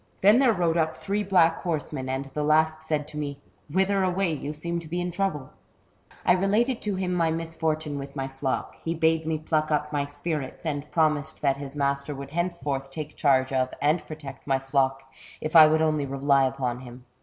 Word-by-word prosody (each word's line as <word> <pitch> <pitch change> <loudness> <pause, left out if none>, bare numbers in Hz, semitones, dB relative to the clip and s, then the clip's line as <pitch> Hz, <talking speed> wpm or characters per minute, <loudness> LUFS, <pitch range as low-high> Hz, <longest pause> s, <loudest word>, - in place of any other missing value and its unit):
" - - -36
Then 210 +5 +6
there 265 -3 +5
rode 175 -5 +1
up 160 -1 0
three 205 +1 -1
black 175 -4 +3
horsemen, 150 -5 -3
and 135 +1 -2
the 150 - -1
last 155 +1 +3
said 155 -2 -2
to 150 - -6
me: 140 -2 -4 0.2
* - - -37
Whither 190 +3 +2
away? 185 -1 +1
you 145 0 -4
seem 170 +3 -3
to 165 - -10
be 175 +3 -2
in 175 0 -2
trouble? 165 -8 -2 0.4
' - - -27
"I - - +5
related 210 +7 +1
to 205 -2 -1
him 185 -1 -1
my 165 -2 +2
misfortune 160 -2 -2
with 140 +1 -8
my 135 -1 -2
flock. 135 0 -3
He 165 +1 -1
bade 160 0 +2
me 160 -1 0
pluck 155 0 0
up 150 0 0
my 140 -1 0
spirits, 145 +1 -4
and 145 -1 -3
promised 155 -2 0
that 135 -1 +2
his 140 0 -8
master 140 0 -1
would 140 0 -8
henceforth 155 -5 -2
take 150 +1 -6
charge 135 -2 +2
of 130 -1 0
and 150 +4 +2
protect 145 -4 -9
my 135 -1 +3
flock, 135 0 0 0.4
if 155 +2 -4
I 155 -1 +11
would 155 +1 +3
only 155 -3 +1
rely 135 0 +3
upon 130 -2 -2
him. 125 0 -11
155 Hz, 210 wpm, -26 LUFS, 140-165 Hz, 0.4 s, I